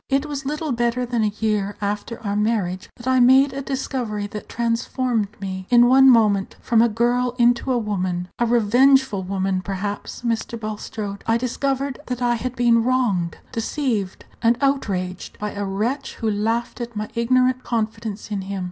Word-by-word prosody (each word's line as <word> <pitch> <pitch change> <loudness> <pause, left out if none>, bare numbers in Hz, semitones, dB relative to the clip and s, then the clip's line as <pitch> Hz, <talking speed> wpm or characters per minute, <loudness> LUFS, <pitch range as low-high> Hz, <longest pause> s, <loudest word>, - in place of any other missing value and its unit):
It 275 +2 +1
was 280 -2 -5
little 300 +1 -2
better 240 +1 0
than 240 -1 -1
a 210 - +1
year 210 -2 0
after 210 +3 -3
our 200 -1 -2
marriage 210 -4 -1
that 240 - -12
I 260 0 +4
made 260 +2 +6
a 275 - -4
discovery 255 -6 -3
that 205 +1 -8
transformed 235 -1 -1
me 190 -1 -5
in 240 -1 +6
one 265 +2 +7
moment 210 -5 +3
from 230 -1 +3
a 235 - +4
girl 240 +2 +1
into 240 +2 +3
a 250 - +2
woman 185 -5 -2
a 240 - +2
revengeful 245 0 +4
woman, 190 0 -1
perhaps, 200 +4 -5
Mr. 230 0 -2
Bulstrode. 210 -1 -5
I 225 0 +3
discovered 270 +2 -2
that 250 -1 -3
I 245 -1 +2
had 250 +2 -3
been 235 -2 +3
wronged, 230 -9 0
deceived, 225 -5 -2 0.2
and 230 0 +3
outraged 195 -10 -1
by 210 0 -4
a 205 0 -4
wretch 220 +9 -2
who 220 -1 -1
laughed 225 +4 -1
at 235 -1 -6
my 210 0 -3
ignorant 255 +2 +2
confidence 220 -2 -3
in 200 -2 -1
him. 195 +1 -5
230 Hz, 175 wpm, -22 LUFS, 205-250 Hz, 0.2 s, one